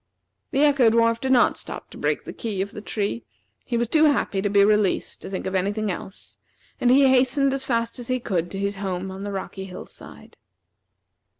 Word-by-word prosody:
The 280 +1 +2
Echo 280 -5 +5
dwarf 230 0 +2
did 265 - -1
not 245 -2 +4
stop - - -8
to - - -11
break - - -1
the - - -7
key 215 -5 -4
of 200 - -9
the 210 - -8
tree. 210 +2 -3 0.4
He 240 - -2
was 235 0 0
too 315 +6 +4
happy 275 -9 +1
to 205 - 0
be 200 0 +5
released 210 -2 +1
to - - -7
think 190 - -4
of 190 - -3
any 190 +1 +1
thing 215 -1 -2
else, 190 +2 -9 0.4
and 245 - +2
he 270 +2 +6
hastened 265 +1 +3
as 270 0 -1
fast 230 0 -1
as 240 - -6
he 255 0 0
could 175 -7 -2
to 195 - -6
his 200 0 -2
home 190 -1 -3
on 190 +1 -8
the 205 - -4
rocky 190 0 -5
hill 185 -1 -9
side. - - -13
215 Hz, 220 wpm, -24 LUFS, 195-255 Hz, 0.4 s, he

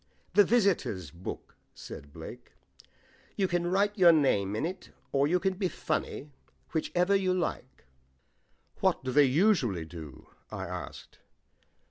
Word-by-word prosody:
"The 205 +2 +7
visitors' 190 - +1
book," 85 +2 -8 0.2
said 70 +1 -10
Blake. 80 +1 -10 0.8
"You 195 -2 +1
can 175 -1 0
just 175 - -1
write 205 +2 +2
your 175 -2 +8
name 105 -11 +2
in 125 - -1
it, 180 +2 -6 0.2
or 140 +1 +2
you 180 +4 +2
can 190 +1 0
be 185 0 -1
funny, 150 -4 -3 0.4
whichever 180 +4 +1
you 185 -2 +2
like." 175 - -4 0.9
"What - - +1
do 130 - -2
they 145 +2 +6
usually 130 - +2
do?" 80 -4 -10 0.2
I - - -5
asked. - - -8
170 Hz, 140 wpm, -29 LUFS, -, 0.9 s, your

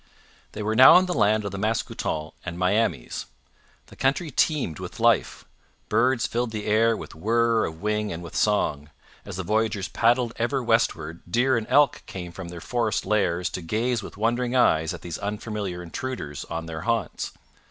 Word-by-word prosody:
They 105 - -5
were 110 +1 0
now 130 +8 +9
in 185 - +4
the 180 - -2
land 105 -4 +2
of 100 - -3
the 100 - -5
Mascoutens 95 -7 -2
and 85 -1 -5
Miamis. 90 - 0 0.6
The - - -16
country 140 +4 0
teemed 135 - 0
with - - -8
life; - - +2 0.4
birds 125 +1 +2
filled 120 -1 -1
the 110 -2 -5
air 110 +1 +3
with - - -9
whirr 115 +6 +2
of 80 +3 -7
wing 105 0 0
and 85 +1 -6
with 85 - -9
song; 75 -8 +1 0.4
as - - -7
the 95 - -3
voyagers 105 0 0
paddled 120 0 +2
ever 125 +3 0
westward 85 -8 0
deer 125 +7 +3
and 115 -2 -2
elk 145 -1 +4
came 90 -2 -7
from 90 0 -8
their 85 0 -8
forest 115 +1 -1
lairs 95 -4 +1
to 90 - -5
gaze 115 +7 -1
with 100 - -10
wondering 120 +3 0
eyes 80 -10 +3
at 85 -3 -8
these 85 -2 -5
unfamiliar 100 -3 -4
intruders 85 - -5
on 80 0 -5
their 80 -1 -6
haunts. 115 -1 -2
105 Hz, 180 wpm, -25 LUFS, 90-120 Hz, 0.6 s, now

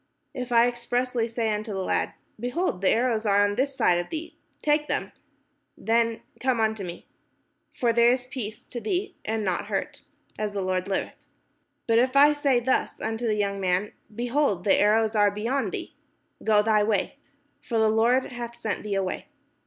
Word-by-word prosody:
If 250 -1 -5
I 235 0 +6
expressly 245 0 -1
say 225 -2 -1
unto 210 0 -4
the 190 -1 -2
lad, - - 0 0.2
Behold, 245 - -1
the 190 - +3
arrows 230 -2 +2
are 205 -1 +4
on 205 0 +1
this 270 +5 -1
side 175 -8 +3
of 175 - -5
thee, 320 0 -6 0.3
take 300 0 +2
them; - - -2 0.7
then 230 0 +1 0.2
come 260 -1 +1
thou: 220 -6 -1 0.7
for 235 -2 +1
there 235 +1 +5
is 250 0 -1
peace 240 -4 -6
to 240 - -7
thee, 360 - -2
and 220 -1 -2
no 185 -2 +1
hurt; - - -4 0.4
as 210 -1 -2
the 200 -1 -2
Lord 185 0 -1
liveth. 195 - -3 0.6
But 230 0 +4
if 255 +2 +1
I 290 +2 +7
say 280 -4 +2
thus 255 +2 0
unto 225 +1 -2
the 215 - +1
young 200 -1 -1
man. 185 +2 0 0.2
Behold, 240 -5 0
the 195 - +4
arrows 220 +1 +3
are 205 -1 +5
beyond 230 +7 -1
thee; - - -6 0.5
go 210 -1 +4
thy 215 -1 +3
way: 205 +3 0 0.4
for 230 - -2
the 220 0 +4
Lord 235 +5 +2
hath 240 -1 -6
sent 225 -3 -3
thee 210 -2 -3
away. 190 -1 -2
225 Hz, 180 wpm, -26 LUFS, 205-250 Hz, 0.7 s, I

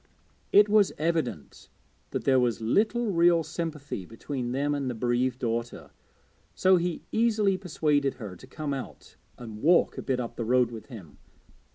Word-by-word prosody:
It 205 +1 +7
was 210 -1 +4
evident 155 - -3 0.4
that - - -3
there 130 -1 +4
was 120 -2 +1
little 215 - +1
real 170 -1 +4
sympathy 150 - -5
between 120 +5 -5
them 140 +3 0
and 140 -3 -2
the 125 - -4
bereaved 125 +2 0
daughter, 115 -1 -4 0.6
so 185 0 +4
he 175 -1 -2
easily 215 -3 +2
persuaded 150 -7 0
her 105 -7 -8
to 110 - -14
come 145 +1 -4
out 135 - -8 0.2
and 110 -3 -9
walk 170 +3 +3
a - - -3
bit 130 -2 -1
up 120 -1 -5
the 115 - -2
road 125 +1 +2
with 115 -2 -9
him. 100 - -12
140 Hz, 165 wpm, -27 LUFS, 120-170 Hz, 0.6 s, It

